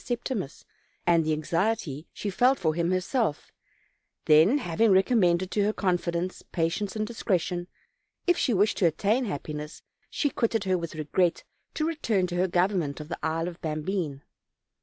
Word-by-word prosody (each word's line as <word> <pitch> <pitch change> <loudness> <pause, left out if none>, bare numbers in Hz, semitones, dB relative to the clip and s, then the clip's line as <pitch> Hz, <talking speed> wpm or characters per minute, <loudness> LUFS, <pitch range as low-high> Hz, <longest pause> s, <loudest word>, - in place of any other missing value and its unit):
Septimus, 235 - -4 0.4
and 170 -1 +4
the 155 - 0
anxiety 165 0 -1
she 205 - -4
felt 255 +7 +3
for 160 -2 0
him 170 +1 0
herself; 185 - -1 0.7
then, 160 - +6
having 215 - +2
recommended 190 -2 +3
to 205 - +1
her 210 - +2
confidence, 175 -2 -1
patience, 175 +5 -1
and 215 0 -1
discretion, 180 -5 -1 0.6
if 355 - +4
she 265 - +1
wished 205 0 +2
to 180 - +4
attain 210 - +1
happiness, 150 -4 -6 0.3
she 290 - 0
quitted 225 -3 0
her 190 -1 +1
with 170 -2 -4
regret, 165 +3 0 0.3
to 310 - 0
return 235 - 0
to 175 -1 -4
her 185 +1 +2
government 175 -5 0
of 150 0 -8
the 170 - -5
Isle 165 +1 -1
of 175 -1 -8
Bambine. 155 -2 -3
180 Hz, 160 wpm, -27 LUFS, 165-215 Hz, 0.7 s, then